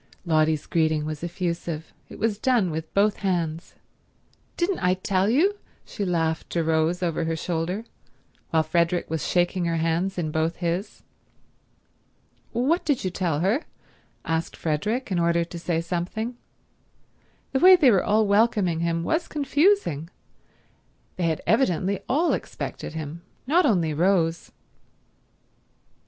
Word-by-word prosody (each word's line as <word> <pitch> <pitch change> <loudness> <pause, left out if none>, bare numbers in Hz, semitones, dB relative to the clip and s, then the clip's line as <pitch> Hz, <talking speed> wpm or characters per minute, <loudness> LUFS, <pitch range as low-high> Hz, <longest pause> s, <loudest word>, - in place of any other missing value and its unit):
Lotty's 155 -2 +2
greeting 155 -2 +1
was 155 0 -5
effusive. 170 -2 -4 0.2
It - - -10
was 220 -2 -1
done 230 -8 +2
with 160 +1 -5
both 205 +1 +3
hands. 170 -4 -2 0.8
"Didn't 365 +2 0
I 180 0 +2
tell 190 +1 0
you?" 380 - +2 0.3
she 210 - -5
laughed 165 -3 -1
to 170 - +1
Rose 160 +3 +1
over 165 -1 -1
her 165 0 -1
shoulder 175 +6 -3 0.6
while 160 -1 +2
Frederick 170 +2 0
was 160 -2 -2
shaking 175 0 +1
her 170 0 0
hands 165 +4 0
in 160 -3 -2
both 160 +2 0
his. 175 +3 -3 1.5
"What 270 +9 +1
did 290 -5 0
you 185 - -1
tell 170 -5 -1
her?" 210 - +1 0.6
asked 165 0 -2
Frederick, 210 - -2
in 180 - +1
order 170 0 +2
to 170 0 -8
say 165 -1 -1
something. 180 +8 -3 1.2
The 265 - +1
way 370 +3 +9
they 285 -8 +5
were 195 - +3
all 215 +1 +3
welcoming 200 -5 +2
him 165 0 -1
was 320 - 0
confusing. 290 - +1 1.1
They 180 - -1
had 160 -1 -1
evidently 195 -5 +1
all 320 +6 +2
expected - - -5
him, 160 +1 -6 0.2
not 315 +4 +3
only 170 - +2
Rose. 170 0 +1
175 Hz, 140 wpm, -25 LUFS, 165-215 Hz, 1.5 s, way